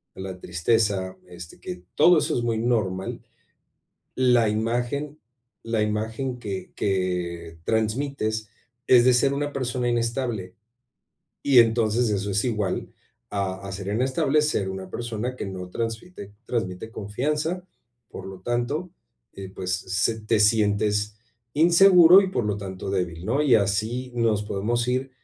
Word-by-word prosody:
la 95 -1 -7
tristeza, 95 +1 0
este, 85 -1 -11
que 90 0 -7
todo 175 -2 +6
eso - - 0
es 120 - -1
muy 115 -1 0
normal, 105 -5 -1 0.9
la 125 -3 +4
imagen 120 +7 -2 0.4
la 115 -1 -1
imagen 110 +4 -2
que 100 -5 -6
que 90 -3 -2
transmites 110 - -1 0.4
es 120 -2 +7
de 125 - +5
ser 135 +3 +3
una 145 +1 -2
persona 125 -2 -2
inestable, 115 -5 -2 0.9
y 135 -3 +5
entonces 115 0 +3
eso 100 0 -1
es 100 +1 0
igual 105 -6 -1 0.4
a 100 -1 -3
a 100 - -6
ser 100 0 -6
inestable, 130 +6 +1
ser 105 -10 0
una 95 0 -6
persona 120 +2 -4
que - - -5
no 95 -1 -6
transmite 115 - -5
transmite 110 -2 -3
confianza, 150 - -2 0.4
por - - -9
lo 95 -1 -8
tanto, 120 - -2 0.4
eh, 95 -1 -8
pues 90 -1 -3
se 100 +5 -1
te 110 +1 +1
sientes 105 -1 +2 0.4
inseguro 175 +3 +7
y, 190 - -1
por 125 - -1
lo 105 -1 -1
tanto, 95 -1 -6
débil, 90 -3 -2
¿no? 135 +6 +1
Y 140 -5 +4
así 110 +5 -1
nos 115 -3 +1
podemos 115 +4 -1
ir 130 +2 -1
110 Hz, 140 wpm, -25 LUFS, 95-125 Hz, 0.9 s, es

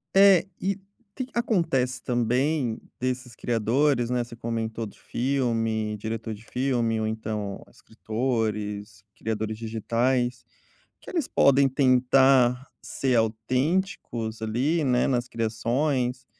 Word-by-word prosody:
É. 195 -2 +7
E 195 +1 0 0.4
que 260 - -3
que 260 - -23
ta - - +1
acontece 135 - 0
também 125 +2 0 0.2
desses 125 -1 -3
criadores, 120 +3 +1
né. 125 -1 +1
Você 120 0 -11
comentou 115 -1 -3
do 105 - -11
filme, 115 -4 -1
diretor 110 +1 -4
de 105 +1 -11
filme 120 -4 0
ou, 110 - -1
então, 110 -2 -4
escritores, 110 -4 -3
criadores 110 0 -3
digitais, 120 +3 0 0.6
que - - -11
eles 330 -8 -1
podem 140 0 +4
tentar 130 -1 +4
ser 130 -2 0
autênticos 115 - -1
ali, 135 +9 +1
né, 125 -2 +2
nas 125 -2 0
criações, 125 +3 -1
120 Hz, 115 wpm, -26 LUFS, 110-135 Hz, 0.6 s, É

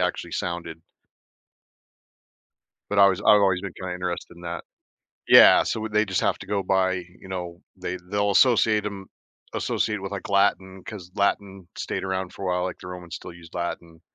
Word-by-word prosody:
actually 90 -1 -2
sounded. 85 -2 -4 2.1
But 105 - 0
I 100 - +9
was 95 0 +2
I've 105 0 +6
always 95 -2 +3
been 100 -3 -6
kinda 90 -1 -6
interested 90 -1 -5
in 85 - -14
that. 85 -1 -5 0.6
Yeah, - - +9
so 110 - -2
w 110 -1 -5
they 105 +1 +3
just 95 -3 -1
have - - +1
to - - -10
go 100 -1 -1
by, 95 0 +2
you 90 +1 -8
know, 90 -2 -6 0.2
they 90 +1 -4
they'll 100 0 +1
associate 110 -1 +4
'em 100 -1 -6 0.5
associate 105 -2 -1
with, 95 - -5
like, 100 - -5
Latin, 95 -1 +1
'cause 90 -4 -9
Latin 100 -2 -1
stayed - - -3
around 95 -1 -3
for - - -10
a - - 0
while, 90 0 0
like, 90 - -4
the 90 - -10
Romans 90 -2 -8
still - - -10
use 85 -1 -14
Latin. 85 -2 -5
95 Hz, 185 wpm, -25 LUFS, 90-100 Hz, 2.1 s, I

